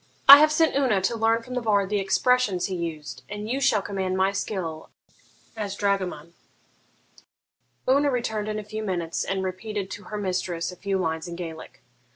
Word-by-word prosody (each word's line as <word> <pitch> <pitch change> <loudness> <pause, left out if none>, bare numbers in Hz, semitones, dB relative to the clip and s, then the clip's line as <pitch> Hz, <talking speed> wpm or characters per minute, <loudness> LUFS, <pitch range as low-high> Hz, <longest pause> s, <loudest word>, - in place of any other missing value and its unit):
I 280 +1 +13
have 305 0 +5
sent 320 -1 +2
Una 255 -8 +2
to 190 +5 -1
learn 225 +1 +1
from 250 - -9
the 250 - -1
bard 205 -3 +1
the 205 - +1
expressions 195 0 +1
he 190 - -3
used, 165 -3 -5
and 210 +1 -6
you 260 +4 -2
shall 220 -7 +2
command 190 -2 -2
my 190 +1 +2
skill 180 -6 -4 0.7
as 205 -3 -4
dragoman.' 185 -6 -2 1.5
Una 280 +2 +4
returned 220 -5 -2
in 215 - -3
a 215 - -4
few 215 +1 -6
minutes, 175 -5 -2
and 190 0 -2
repeated 190 +1 -4
to 205 - -8
her 210 - -6
mistress 180 -3 -2
a - - -10
few 195 +1 -2
lines 160 -2 -2
in 170 - -6
Gaelic. 165 -2 -9
200 Hz, 185 wpm, -25 LUFS, 185-220 Hz, 1.5 s, I